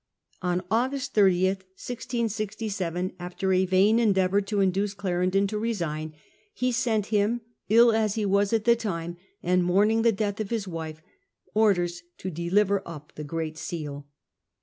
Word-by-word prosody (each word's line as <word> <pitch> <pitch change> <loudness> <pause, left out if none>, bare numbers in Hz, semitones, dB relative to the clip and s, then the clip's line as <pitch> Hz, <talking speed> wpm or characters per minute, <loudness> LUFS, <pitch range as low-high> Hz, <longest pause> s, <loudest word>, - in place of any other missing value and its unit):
On 180 0 0
August 260 +4 0
30, 190 -3 +4
1667 200 -2 -3
after 180 +2 -2
a 185 0 +3
vain 195 +5 +4
endeavour 195 -3 +3
to 205 +1 -2
induce 195 +1 +1
Clarendon 185 0 +1
to 210 +1 -2
resign, 160 -9 -3 0.4
he 250 0 0
sent 230 -4 +1
him, 215 +3 +2 0.3
ill 230 +2 +7
as 220 -2 +1
he 215 -2 0
was 200 0 +2
at 225 -2 +1
the 235 0 +6
time, 175 -7 -4 0.3
and 180 0 +2
mourning 205 +5 +3
the 230 0 +4
death 205 0 -2
of 215 -2 -3
his 225 -4 -2
wife, 160 -2 -6 0.5
orders 175 -5 +2 0.2
to 185 - -5
deliver 190 +4 +1
up 150 -4 -10
the 150 - -7
Great 160 +1 -4
Seal. 145 -5 -5
195 Hz, 150 wpm, -26 LUFS, 175-220 Hz, 0.5 s, ill